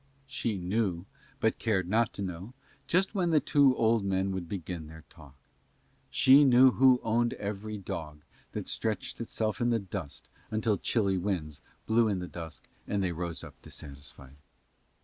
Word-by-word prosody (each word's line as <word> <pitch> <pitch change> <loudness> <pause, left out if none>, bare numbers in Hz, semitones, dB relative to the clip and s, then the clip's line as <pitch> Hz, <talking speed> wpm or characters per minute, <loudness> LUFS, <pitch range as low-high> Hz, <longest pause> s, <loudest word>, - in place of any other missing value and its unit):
She 125 -6 -2
knew, 95 -1 -1 0.3
but 110 -4 +1
cared 95 -6 0
not 110 +3 +2
to 100 - -5
know, 95 +6 -6 0.3
just 190 +4 +2
when 185 -4 +1
the 160 -2 +5
two 140 -1 +4
old 115 -2 +3
men 95 0 0
would 95 -3 -4
begin 85 -4 -5
their 80 0 -12
talk. 70 -3 -15 0.7
She 135 +3 +6
knew 130 -1 +7
who 130 0 +5
owned 115 +1 +1
every 105 +1 -5
dog 75 -6 -6 0.3
that - - -4
stretched 110 +1 -2
itself 110 -2 -2
in 120 - +2
the 115 - +3
dust 90 -8 -7 0.2
until 110 -2 0
chilly 100 -5 +1
winds 80 -7 -3 0.2
blew 115 +1 +3
in 100 -3 0
the 90 0 -5
dusk 80 -7 -8 0.2
and 100 -1 0
they 90 - 0
rose 85 0 -4
up - - -10
dissatisfied. 70 -2 -9
100 Hz, 165 wpm, -30 LUFS, 85-115 Hz, 0.7 s, knew